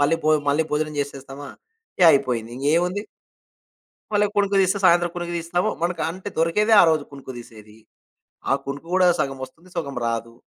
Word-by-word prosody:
మళ్ళీ 145 Hz, +3 st, +3 dB
భో 155 Hz, -, +3 dB, 0.2 s
మళ్ళీ 155 Hz, +3 st, +2 dB
భోజనం 155 Hz, 0 st, -1 dB
చేసేస్తామా? 140 Hz, 0 st, -7 dB, 0.5 s
ఇగ 180 Hz, -, +5 dB
అయిపోయింది. 125 Hz, -5 st, 0 dB
ఇంగేముంది? 175 Hz, +8 st, 0 dB, 1.1 s
మళ్ళొకునుకు 205 Hz, -1 st, +1 dB
తీస్తే 190 Hz, +2 st, +1 dB
సాయంత్రం 175 Hz, -1 st, +4 dB
కునుకు 175 Hz, 0 st, -4 dB
తీస్తాము, 170 Hz, +2 st, -1 dB
మనకు 170 Hz, -2 st, -1 dB
అంటే 190 Hz, +4 st, -7 dB
దొరికేదే 210 Hz, +7 st, +3 dB
ఆ -, -, +6 dB
రోజు 155 Hz, -2 st, 0 dB
కునుకు 135 Hz, -1 st, -9 dB
తీసేది. 110 Hz, -2 st, -14 dB, 0.7 s
ఆ -, -, +5 dB
కునుకు 140 Hz, +4 st, -6 dB
కూడా 185 Hz, -1 st, +5 dB
సగం 135 Hz, -1 st, -3 dB
వస్తుంది, 165 Hz, +7 st, -21 dB
సగం 140 Hz, -5 st, -4 dB
రాదు. 115 Hz, 0 st, -3 dB
160 Hz, 155 wpm, -22 LUFS, 135-180 Hz, 1.1 s, ఆ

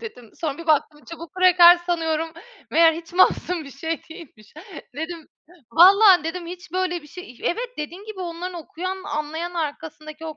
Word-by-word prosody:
dedim 250 Hz, -, -10 dB
sonra 305 Hz, -3 st, -4 dB
bir 335 Hz, -, -9 dB
baktım 300 Hz, -1 st, +1 dB
çubuk 335 Hz, -1 st, -9 dB
kraker 360 Hz, -1 st, +7 dB
sanıyorum 330 Hz, -2 st, -2 dB, 0.4 s
meğer 330 Hz, 0 st, +5 dB
hiç 330 Hz, +1 st, -9 dB
masum 355 Hz, -2 st, +2 dB
bir 280 Hz, -, -11 dB
şey 320 Hz, +4 st, -4 dB
değilmiş. 300 Hz, -, -14 dB, 0.4 s
Dedim, 320 Hz, +1 st, -6 dB, 0.4 s
"Vallaha" 375 Hz, -, +7 dB
dedim, 340 Hz, +2 st, -5 dB
"hiç 355 Hz, 0 st, -10 dB
böyle 365 Hz, -2 st, -2 dB
bir -, -, -15 dB
şey" 360 Hz, +1 st, -11 dB
İh 245 Hz, -, -22 dB
Evet, 480 Hz, +8 st, -2 dB
dediğin 345 Hz, +7 st, -7 dB
gibi 430 Hz, -3 st, -9 dB
onların 355 Hz, +1 st, -6 dB
okuyan, 370 Hz, +4 st, -6 dB
anlayan 310 Hz, +3 st, -4 dB
arkasındaki 310 Hz, 0 st, -6 dB
o 310 Hz, -2 st, -7 dB
335 Hz, 170 wpm, -22 LUFS, 310-360 Hz, 0.4 s, kraker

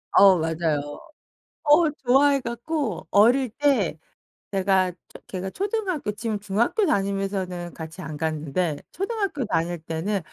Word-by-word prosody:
어 195 Hz, -2 st, +8 dB
맞아요. 160 Hz, -2 st, 0 dB, 0.8 s
어 305 Hz, +2 st, +5 dB, 0.2 s
좋아해 275 Hz, +3 st, +5 dB
갖고 260 Hz, +5 st, -3 dB
어릴 245 Hz, +5 st, +4 dB
때 235 Hz, -, +1 dB, 0.5 s
제가 190 Hz, -1 st, +2 dB
초 180 Hz, -, -17 dB
걔가 190 Hz, 0 st, -4 dB
초등학교 385 Hz, -, -2 dB
지금 215 Hz, +1 st, -3 dB
중학교 215 Hz, -, +1 dB
다니면서는 195 Hz, -, -1 dB
같이 160 Hz, +3 st, -8 dB
안 155 Hz, -2 st, -6 dB
갔는데 155 Hz, +1 st, -1 dB
초등학교 390 Hz, -, -2 dB
다닐 175 Hz, -4 st, -1 dB
때는 165 Hz, +6 st, -2 dB
200 Hz, 265 characters per minute, -24 LUFS, 175-275 Hz, 0.8 s, 어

